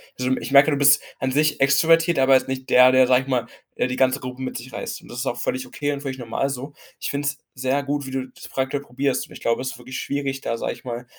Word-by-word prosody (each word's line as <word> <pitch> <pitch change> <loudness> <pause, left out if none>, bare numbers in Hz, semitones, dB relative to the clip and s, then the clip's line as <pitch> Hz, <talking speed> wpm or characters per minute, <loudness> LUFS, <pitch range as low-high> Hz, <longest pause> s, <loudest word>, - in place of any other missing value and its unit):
sind. 130 +1 0
Ich - - -6
merke, 140 +3 +7
du 145 - +1
bist 140 0 +5 0.2
an 130 -1 -1
sich 150 +1 +2
extrovertiert, 165 +4 +4
aber 135 0 +5
jetzt 130 - +2
nicht 130 0 -5
der, 125 0 +7
der, 130 0 +6
sage 125 +1 +3
ich - - -15
mal, 125 -3 0 0.3
äh, - - 0
die 125 0 -4
ganze 130 +1 +2
Gruppe 125 0 -7
mit 130 - -4
sich 125 +2 -7
reißt. - - -5
Und - - -16
das 120 - -6
ist 130 - -2
auch 120 - -1
völlig 130 +1 -2
okay 145 +3 -3
und 140 - -3
völlig 135 -2 -5
normal 120 +3 -2
so. 140 +1 -5 0.3
Ich - - -2
finde 145 0 -2
es - - -1 0.2
sehr 130 +2 -1
gut, 145 0 -2
wie 130 - -7
du 130 0 -3
das - - -12
prakt 130 0 -2
probierst. 135 0 -2
Ich - - -12
glaube, 115 - +1
es 130 0 -3
ist 135 - -10
wirklich 125 +2 -7
schwierig, 140 -1 -3
da, 115 - -3
sage - - -2
ich - - -11
mal, 120 0 -5
130 Hz, 285 wpm, -23 LUFS, 130-140 Hz, 0.3 s, merke